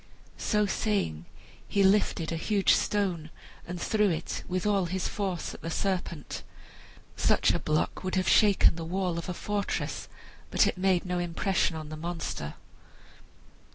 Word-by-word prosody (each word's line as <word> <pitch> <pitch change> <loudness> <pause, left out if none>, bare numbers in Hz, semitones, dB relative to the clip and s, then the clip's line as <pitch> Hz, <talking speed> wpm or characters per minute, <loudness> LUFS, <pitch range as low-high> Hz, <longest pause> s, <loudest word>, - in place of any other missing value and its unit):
So 210 -1 +2
saying 190 - -1 0.4
he 200 - +2
lifted 190 -4 +3
a - - -1
huge 200 +4 +3
stone 180 -6 0 0.4
and 175 0 -5
threw 210 +2 +2
it 165 -1 -3
with 185 +1 -2
all 200 -3 +2
his 185 +2 -1
force 190 -5 -3
at - - -11
the 165 - -4
serpent. 175 -4 -2 0.7
Such - - +3
a - - 0
block 155 +4 -1
would 185 0 -2
have 185 0 +1
shaken 200 -5 +5
the 165 - -4
wall 180 0 -1
of 170 - -6
a - - -1
fortress, 205 +2 -2 0.4
but - - +4
it - - +1
made 185 -2 +2
no 180 -1 -1
impression 175 0 0
on 155 -1 -6
the 155 - -6
monster. 165 - -4
180 Hz, 155 wpm, -29 LUFS, 165-200 Hz, 0.7 s, shaken